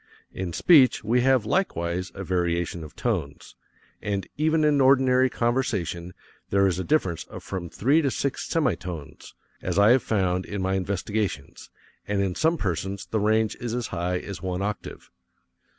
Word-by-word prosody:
In 95 -2 -4
speech 135 - +5
we 120 +3 +2
have 130 -3 +3
likewise 90 - -1
a 95 - -5
variation 85 -2 -1
of 75 - -11
tones, 90 -13 -3 0.5
and 100 -2 -2
even 155 +1 +2
in 150 -2 +3
ordinary 130 -1 +4
conversation 95 -8 -1 0.3
there 100 0 +3
is 95 -1 +1
a - - -1
difference 95 - 0
of - - -10
from 90 -3 -5
three 140 - +2
to 140 - +1
six 140 +1 -2
semi 150 -9 +2
tones, 85 -4 -9 0.3
as 90 0 -2
I 100 +3 +6
have 130 +1 +5
found 95 -4 0
in 105 - -4
my 95 0 0
investigations, 95 -4 -3 0.4
and 105 -1 0
in 95 -2 0
some 160 - +1
persons 95 - -3
the 110 - -1
range 110 +1 +2
is 120 -1 -4
as 125 -2 -3
high 90 +1 -1
as 100 +2 -7
one 95 0 -2
octave. 105 0 -6
100 Hz, 165 wpm, -25 LUFS, 90-125 Hz, 0.5 s, I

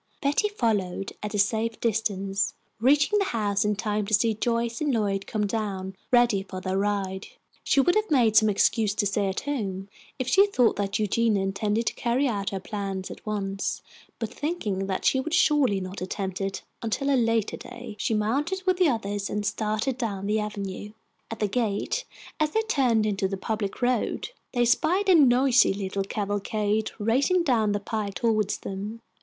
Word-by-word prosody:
Betty 290 +9 +1
followed 205 - -1
at 210 0 -4
a - - +1
safe 220 +3 +1
distance, 200 -3 -1 0.2
reaching 290 - +4
the 395 - +1
house 210 - 0
in 210 0 +1
time 210 0 -1
to 220 - +4
see 225 +2 +2
Joyce 230 +2 -1
and 295 -2 +1
Lloyd 200 -4 0
come 210 -1 -1
down, 195 -3 -3
ready 240 -5 +4
for 190 -1 -7
their 185 0 -2
ride. 195 -1 -1 0.4
She - - +2
would 350 +6 +4
have 430 +2 +1
made 240 -8 +3
some 220 -1 +6
excuse 210 +1 +2
to 210 - +1
stay 200 0 0
at 190 - -2
home 200 -9 -3 0.3
if 255 -2 -3
she 395 +9 +5
thought 250 - +3
that 195 -1 -1
Eugenia 215 -1 +1
intended 210 +3 -1
to - - 0
carry 250 +4 0
out 200 -5 -1
her 195 - -4
plans 195 -1 -4
at - - -10
once; 195 -2 -2 0.3
but 225 0 -4
thinking 210 - -2
she 265 - +3
would 320 +5 -1
surely 290 - +3
not 185 +1 -6
attempt 190 0 -4
it 195 0 -3 0.2
until 275 +5 -1
a - - +4
later 230 -3 +1
day, 240 -3 -9
she 220 - 0
mounted 285 - 0
with 370 -1 +2
the 360 -4 +4
others 205 -4 -2
and 210 0 -2
started 215 +5 -1
down 200 -5 -3
the 210 +2 +1
avenue. 205 -1 -5 0.4
At 225 - -5
the 210 - 0
gate, 225 - -1 0.3
as 310 -1 +2
they 445 +7 0
turned 250 - +2
into 195 -2 0
the 195 0 -4
public 210 +3 -3
road, 245 -2 0 0.2
they 245 -1 +2
spied 355 - +2
a - - +8
noisy 255 - +5
little 195 0 -2
cavalcade 205 +1 -1
racing 265 - +2
down 225 -8 +2
the 205 - 0
pike 205 -1 -4
toward 215 -1 +1
them. 205 +4 -5
215 Hz, 185 wpm, -26 LUFS, 200-245 Hz, 0.4 s, a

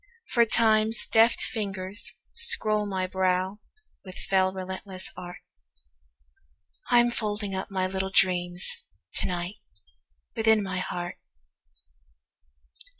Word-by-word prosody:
For 235 -1 +3
Time's 220 0 +3
deft 225 +1 +4
fingers 195 -2 -1 0.2
scroll 215 - +4
my 190 -2 -2
browWith 190 - -4
fell 190 -1 +2
relentless 190 0 -4 1.8
art—I'm 240 0 +4
folding 210 -3 -3
up 190 0 -4
my 190 -1 -1
little 190 0 -3
dreamsTo 180 -1 0
night, 180 +3 -4 0.8
within 220 -1 +3
my 185 -1 -3
heart! 175 -1 -5
195 Hz, 90 wpm, -26 LUFS, 185-220 Hz, 1.8 s, deft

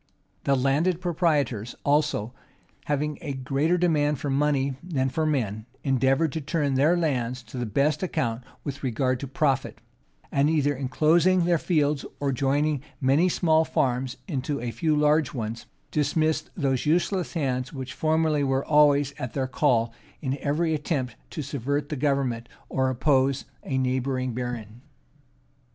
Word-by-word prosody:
The 140 - +3
landed 145 +7 +1
proprietors 150 - 0
also, 145 -6 +1 0.5
having 150 0 -1
a 145 -4 -4
greater 135 +6 0
demand 150 -4 +2
for 140 +2 -3
money 140 -1 +1
than 140 -7 -1
for 155 +4 -1
men, 110 -7 -1 0.2
endeavored 135 +3 +2
to 160 - -3
turn 145 -1 0
their 150 +7 +3
lands 125 -7 -1
to 115 +2 -10
the 120 - -2
best 140 - +1
account 120 -10 -1 0.2
with 140 -2 -5
regard 130 0 0
to 140 - -5
profit; 135 -1 0 0.5
and 140 +2 +3
either 145 -2 +2
enclosing 160 +7 +3
their 170 -2 +3
fields, 150 -5 +1 0.2
or 140 -1 0
joining 140 +2 +1 0.2
many 145 +6 +3
small 160 -2 +3
farms 125 -4 -1
into 140 -3 -2
a 120 -1 -3
few 155 +4 +1
large 150 0 +2
ones, 115 -1 -4 0.2
dismissed 155 +2 +1
those 135 -4 0
useless 175 +3 +1
hands 130 -5 -1
which 130 -4 -6
formerly 155 -2 +1
were 135 0 0
always 145 -2 +4
at 130 -4 -4
their 135 -2 0
call 125 -4 +1 0.3
in 135 -3 -2
every 160 +4 0
attempt 145 -5 -2
to 155 - -5
subvert 145 +2 -2
the 150 - -2
government, 130 -4 0 0.2
or 130 0 +1
oppose 135 +1 +2 0.2
a 135 - -2
neighboring 130 -1 0
baron. 120 -2 -5
140 Hz, 150 wpm, -26 LUFS, 130-155 Hz, 0.5 s, always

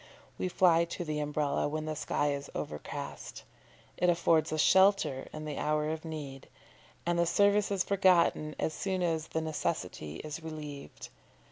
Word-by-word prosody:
We - - 0
fly 170 -2 +4
to 170 +1 -5
the 155 -1 -2
Umbrella 150 -1 0
when 155 +1 -3
the 155 0 -3
sky 145 0 0
is 140 0 -6
overcast 75 - -6 0.5
it 180 - +3
affords 165 -2 +3
us 155 - -1
shelter 190 -7 +4
in 155 0 -7
the 150 -2 -4
hour 150 0 0
of 160 0 -4
need 145 -4 -7 0.6
and 170 0 +1
the 170 - +3
service 205 +3 +3
is 195 -2 +1
forgotten 180 -5 +3
as 160 - -1
soon 185 +2 -2
as 160 -2 0
the 160 - -2
necessity 150 - -3
is 155 +1 -6
relieved. 150 -3 -8
155 Hz, 160 wpm, -31 LUFS, 150-175 Hz, 0.6 s, fly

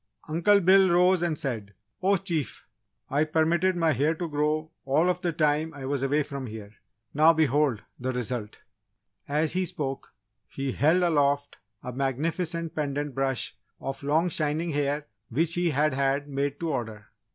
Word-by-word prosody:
Uncle 170 +6 +4
Bill 190 +1 +5
rose 180 +1 +4
and 170 -3 0
said: 110 -8 -3 0.3
"Oh 195 +1 +3
Chief, 170 -6 -3 0.4
I 145 +3 +2
permitted 165 +4 +2
my 165 -2 +2
hair 150 +4 +1
to 170 +1 -3
grow 155 +1 -1
all 155 +7 +3
of 180 0 -5
the 175 -2 0
time 155 0 +1
I 135 -2 -7
was 140 0 -1
away 145 +2 +2
from 140 -2 -6
here. 105 -2 -9 0.4
Now, 155 +3 +6
behold, 145 -7 +2 0.2
the 130 +1 -2
result!" 120 -3 -4 0.7
As 150 +2 0
he 185 +1 +1
spoke, 145 -7 -5 0.4
he 135 -1 -3
held 160 +8 +3
aloft 145 -4 +1 0.3
a 125 - -5
magnificent 160 +5 -1
pendant 145 -1 -2
brush 135 -3 -1 0.2
of 135 0 -5
long 155 +5 +2
shining 155 +1 -1
hair 145 0 -1 0.2
which 160 +7 +1
he 175 0 +1
had 150 0 +2
had 140 +1 0
made 140 0 -2
to 165 -1 -1
order. 110 -5 -4
150 Hz, 165 wpm, -27 LUFS, 135-165 Hz, 0.7 s, Now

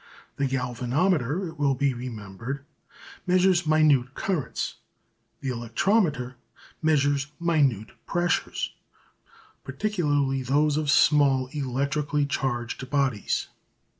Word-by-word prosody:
The 140 - +1
galvanometer, 135 +6 0
it 160 -1 -13
will 140 -2 +2
be 140 +1 +1
remembered, 120 +2 -6 0.6
measures 180 -2 +3
minute 150 -5 +3
currents; 180 -8 -2 0.6
the 135 - -3
electrometer 125 - 0 0.4
measures 145 -3 +2
minute 145 - +1 0.2
pressures, 175 0 -1 0.9
particularly 145 -10 0
those 145 +3 +2
of 155 -1 -1
small 140 -4 +4
electrically 140 +1 -1
charged 130 -2 -3
bodies. 135 -7 0
140 Hz, 90 wpm, -26 LUFS, 125-155 Hz, 0.9 s, small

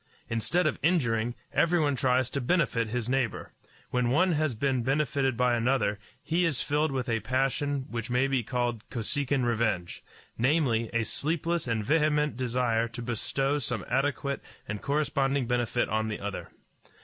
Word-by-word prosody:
Instead 145 +11 +1
of 155 - 0
injuring, 120 -8 +1 0.2
everyone 160 -4 +3
tries 130 -2 +2
to 140 - -1
benefit 125 -5 +1
his 120 +1 -3
neighbor. 130 -3 -1 0.4
When 125 -1 +1
one 180 +8 +3
has 155 -5 0
been 130 +1 0
benefited 135 -1 0
by 125 -1 +3
another, 115 -4 +1 0.2
he 170 +3 +1
is 165 -7 +1
filled 150 +1 +1
with 130 -1 -2
a 115 -1 +1
passion 135 +2 0
which 115 -4 -5
may 125 +2 +2
be 135 -2 +1
called 120 -1 -2
Kosekin 130 +3 0
revenge 110 -7 -1 0.4
namely, 125 -4 +2
a 115 -1 +1
sleepless 165 +5 -1
and 110 -3 -1
vehement 150 +1 +2
desire 120 -2 0
to 120 +1 -7
bestow 135 +4 -1
some 120 -5 -3
adequate 140 +1 0 0.3
and 105 0 -4
corresponding 140 -2 +1
benefit 120 0 0
on 110 0 0
the 105 - -4
other. 100 0 -5
130 Hz, 155 wpm, -28 LUFS, 115-145 Hz, 0.4 s, everyone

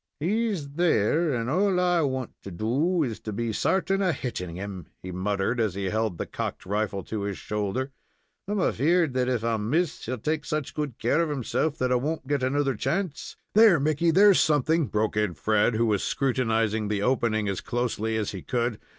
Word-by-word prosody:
"He's 200 -1 0
there; 160 0 +2
and 115 -3 -1
all 185 +6 +2
I 180 -1 +3
want 130 -4 -2
to - - -8
do 135 - 0
is 115 -6 -3
to 110 - -6
be 115 +2 -2
certain 195 - +1
of 180 -6 +1
hitting 90 -10 -5
him," 95 -2 -6 0.2
he 95 - -6
muttered, 100 +5 -1
as 110 -5 0
he 95 -2 -2
held 110 -5 -1
the - - -3
cocked - - -5
rifle 100 0 -1
to 110 -2 -4
his 100 -1 -3
shoulder. 105 +6 -3 0.6
"I'm 205 0 -1
afeard 165 -1 +2
that 130 0 +1
if 120 -3 0
I 115 -1 +1
miss 145 +11 -1
he'll 130 +2 -2
take 150 +6 -2
such 150 -2 -3
good 145 -5 -3
care 170 - +2
of 165 - 0
himself 145 +3 -1
that 125 0 0
I - - +4
won't 150 +3 -3
get 140 0 0
another 135 +1 +1
chance 175 - -3
" - - -51
"There, 215 -6 +7
Mickey, 155 +3 +1
there's 195 +3 +6
something," 155 +1 +2
broke 110 0 -1
in 105 -5 0
Fred, 110 +4 +2
who 115 +1 +2
was 105 -3 +1
scrutinizing 115 -5 0
the 100 -1 -1
opening 110 -3 +1
as 100 -2 -2
closely 115 -2 -1
as 105 -2 -1
he 95 - -6
could. 120 -3 -1
125 Hz, 200 wpm, -26 LUFS, 105-155 Hz, 0.6 s, There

